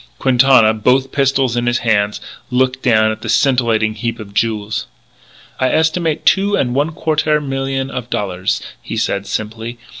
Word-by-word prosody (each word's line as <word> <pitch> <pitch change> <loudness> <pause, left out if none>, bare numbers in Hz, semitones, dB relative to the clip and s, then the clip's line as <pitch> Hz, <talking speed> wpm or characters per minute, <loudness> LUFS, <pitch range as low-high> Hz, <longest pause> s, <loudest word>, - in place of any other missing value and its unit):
Quintana, 125 - +4
both 130 +5 +1
pistols 135 -3 +1
in 120 0 -1
his 120 0 +2
hands, 105 -2 +1 0.3
looked 130 0 0
down 110 -3 +3
at 110 - -7
the - - -6
scintillating 115 -6 +2
heap 115 +2 -4
of 100 -2 -10
jewels. 110 0 -1 0.7
"I 130 - +2
estimate 160 +1 0
two 200 +1 +3
and 125 -2 0
one 145 +4 +1
quartaire 155 -1 +1
million 135 -1 -3
of 125 -2 -6
dollaires," 95 -4 -2 0.2
he - - -6
said 100 0 -1
simply. 110 +2 -5
125 Hz, 155 wpm, -17 LUFS, 110-135 Hz, 0.7 s, Quintana